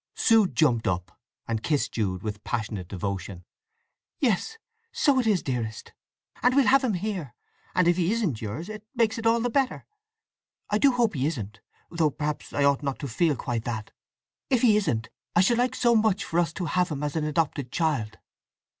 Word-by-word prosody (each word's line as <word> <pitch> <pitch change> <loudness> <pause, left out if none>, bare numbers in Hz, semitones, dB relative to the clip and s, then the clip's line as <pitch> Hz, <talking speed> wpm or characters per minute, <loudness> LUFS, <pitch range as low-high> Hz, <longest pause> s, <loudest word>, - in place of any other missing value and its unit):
Sue 225 -4 +4
jumped 125 -10 +2
up 90 0 -3 0.3
and 115 -1 -2
kissed 145 +3 0
Jude 95 -5 -2
with 105 -1 -5
passionate 110 -6 -3
devotion. 95 -2 -5 0.7
"Yes—so 445 - 0
it 245 - 0
is, 205 -5 +2
dearest! 115 -4 -4 0.5
And 250 +1 +3
we'll 280 -2 +5
have 275 +2 +5
him 230 -6 +1
here! 180 - -4 0.4
And 180 -2 +3
if 175 0 +3
he 180 +1 +1
isn't 190 - -1
yours 115 - -5
it 215 -1 -8
makes 230 -1 +1
it 225 - 0
all 230 +1 +4
the 245 +1 -1
better. 270 +1 0 0.9
I 210 - +2
do 280 +2 +5
hope 240 -3 +2
he 135 -1 0
isn't—though 150 - -3
perhaps 150 +1 -4
I 145 - 0
ought 140 0 +3
not 140 -2 -2
to 140 - -5
feel 150 +5 +1
quite 120 -3 -3
that! 110 -3 -4 0.6
If 255 -3 +2
he 220 -4 +6
isn't, 125 - 0 0.3
I 175 - +6
should 235 +5 +3
like 250 +1 +1
so 235 -1 +3
much 215 -3 +2
for 170 - -1
us 170 -2 +1
to 180 - -3
have 180 +3 +1
him 150 -2 -4
as 145 0 -2
an 155 -2 0
adopted 145 -4 -1
child!" 140 -10 -1
160 Hz, 190 wpm, -26 LUFS, -, 0.9 s, he